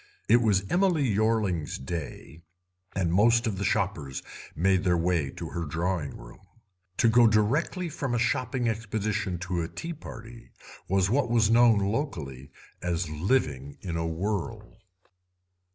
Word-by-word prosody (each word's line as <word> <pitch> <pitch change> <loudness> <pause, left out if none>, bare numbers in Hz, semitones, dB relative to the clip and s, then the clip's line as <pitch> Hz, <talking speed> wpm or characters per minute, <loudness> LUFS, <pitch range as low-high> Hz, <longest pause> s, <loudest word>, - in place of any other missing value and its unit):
It 120 +2 +5
was 100 -4 +2
Emily 175 - +2
Yorling's 105 - 0
"day", 80 +1 -7 0.5
and 90 -3 0
most 115 +5 +4
of 105 -5 -2
the - - -1
shoppers 90 -10 -1 0.3
made 95 +2 +2
their 90 -3 +3
way 85 -4 +1
to - - -5
her 85 - -3
drawing 80 0 -2
room. - - -13 0.6
To - - +4
go 115 +1 +6
direct 110 - +2 0.2
from 130 -4 -2
a - - +1
shopping 120 +2 0
expedition 105 -4 -2
to 90 -1 -2
a 80 - -2
tea 170 - -6
party 115 -6 -11 0.4
was 95 +1 +2
what 130 -1 +2
was 115 -2 +3
known 115 -1 +6
locally 95 - -3 0.3
as 85 -2 -2
"living 75 - -1
in 85 -4 -4
a 80 0 -1
whirl". 105 +5 -4
100 Hz, 145 wpm, -27 LUFS, 85-115 Hz, 0.6 s, go